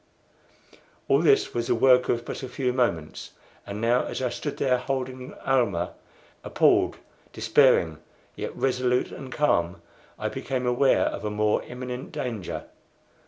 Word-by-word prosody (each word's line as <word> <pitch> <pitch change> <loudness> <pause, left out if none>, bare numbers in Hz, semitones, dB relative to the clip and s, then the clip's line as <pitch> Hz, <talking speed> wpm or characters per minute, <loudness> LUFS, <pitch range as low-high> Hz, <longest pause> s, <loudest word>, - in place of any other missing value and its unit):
All - - +4
this 415 -1 +3
was 120 -1 -2
the 125 - +2
work 125 +1 +4
of 120 0 0
but - - -5
a 130 - -6
few 125 0 -1
moments. 85 -12 -2 0.3
And 100 +1 -5
now 120 +2 +2
as - - -4
I 130 -1 0
stood 145 +4 -5
there 125 -2 +2
holding 130 0 -4
Almah 110 -10 +1 0.5
appalled, - - +3 0.4
despairing, 110 - +3 0.4
yet - - -6
resolute 125 -1 +1
and 130 -2 -9
calm 90 - +1 0.4
I - - -2
became 130 -2 -3
aware 125 +2 +3
of - - -3
a 105 - -1
more 105 0 +1
imminent 125 +1 -7
danger. 115 -8 -4
125 Hz, 145 wpm, -26 LUFS, 110-130 Hz, 0.5 s, All